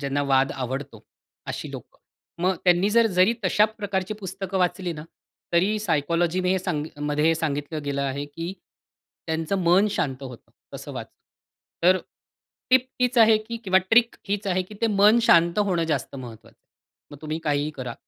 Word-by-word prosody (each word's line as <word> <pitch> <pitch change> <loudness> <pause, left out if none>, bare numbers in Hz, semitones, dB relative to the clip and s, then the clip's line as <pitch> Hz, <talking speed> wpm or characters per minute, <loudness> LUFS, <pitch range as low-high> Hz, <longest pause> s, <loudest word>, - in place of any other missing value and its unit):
ज्यांना 140 0 -1
वाद 135 +1 +3
आवडतो 130 -3 -5 0.4
अशी - - -5
लोकं. - - -11 0.4
मग 185 +1 +2
त्यांनी 180 +2 +4
जर 230 +1 +4
जरी 185 +6 +5
तशा 200 +3 +4
प्रकारची 205 -2 -3
पुस्तकं 190 0 -4
वाचली 180 0 0
ना 150 -1 -8 0.5
तरी 190 +5 +2
सायकॉलॉजीने 175 +1 0
सांग 175 -5 -2
मध्ये 150 +2 +1
सांगितलं 150 -1 -3
गेलं 140 -1 -2
आहे, 140 +1 -2
की 165 +5 -6 0.7
त्यांचं 160 +4 -1
मन 180 +5 +5
शांत 135 -8 -2
होतं 125 -3 -10 0.2
तसं - - -8
वाचून. - - -8 0.7
तर 185 +2 +5 0.7
टिप 255 0 +5
हीच 250 0 +2
आहे 225 -1 +7
की 225 +2 -7
किंवा 190 -1 +4
ट्रिक 225 +5 +3
हीच 205 +1 -2
आहे, 185 -1 +1
की 200 +4 -13
ते 230 - +2
मन 210 +1 +5
शांत 170 -6 +4
होणं 185 -5 +1
जास्त 150 -6 -2
महत्वाचं 120 -4 -11
आहे. - - -54 0.5
मग 145 - -11
तुम्ही 155 +1 -3
काहीही 145 0 0
करा. 130 -5 -6
175 Hz, 165 wpm, -24 LUFS, 145-200 Hz, 0.7 s, आहे